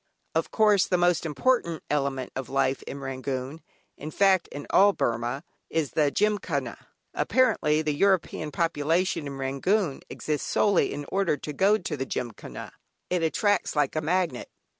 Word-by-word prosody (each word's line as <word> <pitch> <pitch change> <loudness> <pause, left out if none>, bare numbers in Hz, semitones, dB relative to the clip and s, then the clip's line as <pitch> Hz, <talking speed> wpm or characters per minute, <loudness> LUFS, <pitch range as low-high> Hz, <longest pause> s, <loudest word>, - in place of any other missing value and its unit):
Of - - 0
course 210 -3 +4
the 180 - +2
most 175 -1 +2
important 170 - 0
element 140 -3 -1
of 130 -2 -5
life 135 0 +1
in 140 - -6
Rangoon, 135 +2 -4 0.4
in 150 - -6
fact 190 +1 +3
in 145 - -8
all 200 +1 +6
Burmah, 120 +3 -2 0.3
is 160 -4 -1
the 150 -2 +2
Gymkhana. 210 +7 -1 0.3
Apparently, 155 -12 +2
the 150 -1 0
European 185 -2 +1
population 165 +1 0
in 140 -1 -6
Rangoon 140 +6 0
exists 150 -6 -3
solely 205 -3 +2
in 145 0 -5
order 190 -6 +1
to 150 +2 -6
go 195 +7 +4
to 175 -6 -4
the 135 -1 -4
Gymkhana. 120 -4 -6 0.4
It 180 -1 +1
attracts 195 +5 +1
like 145 -1 +1
a 155 - 0
magnet. 165 -5 -1
155 Hz, 155 wpm, -26 LUFS, 140-185 Hz, 0.4 s, all